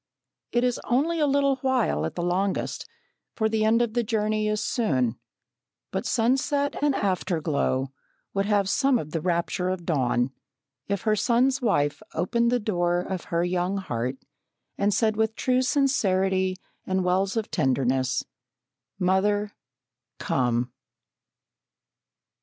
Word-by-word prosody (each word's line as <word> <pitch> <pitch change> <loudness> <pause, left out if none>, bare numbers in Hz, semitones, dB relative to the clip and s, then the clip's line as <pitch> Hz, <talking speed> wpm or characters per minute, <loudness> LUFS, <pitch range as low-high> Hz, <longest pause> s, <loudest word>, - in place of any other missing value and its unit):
It 240 - +1
is 250 -1 0
only 315 +7 +1
a 300 - +3
little 275 -1 +2
while 260 -2 +1
at - - -8
the 175 - -2
longest, 185 +3 -1 0.5
for 220 - +1
the 220 0 0
end 225 +2 +4
of 225 -2 -3
the 240 - +2
journey 215 -1 0
is 215 0 0
soon, 130 - 0 0.7
but - - -2
sunset 270 +5 +1
and 290 -2 +2
afterglow 160 -8 0 0.4
would 195 0 0
have 205 -2 +2
some 270 +5 +3
of 155 -8 -6
the 165 - -2
rapture 175 +1 0
of 185 -2 -3
dawn, 130 -5 +1 0.6
if 200 -1 -2
her 215 -1 +2
son's 250 +5 +2
wife 145 -11 +1
opened 235 +8 +1
the 245 - +2
door 175 -5 0
of 185 -1 -5
her 170 0 0
young 180 +2 0
heart 130 -8 -3 0.6
and 200 +1 +1
said 215 +1 +2
with 220 0 +1
true 255 0 +1
sincerity 195 -9 +1 0.3
and 190 0 0
wells 190 +4 +1
of 220 - -2
tenderness: 130 0 +1 0.7
"Mother 200 +2 +1 0.7
Come!" 120 -1 0
200 Hz, 135 wpm, -26 LUFS, 175-235 Hz, 0.7 s, end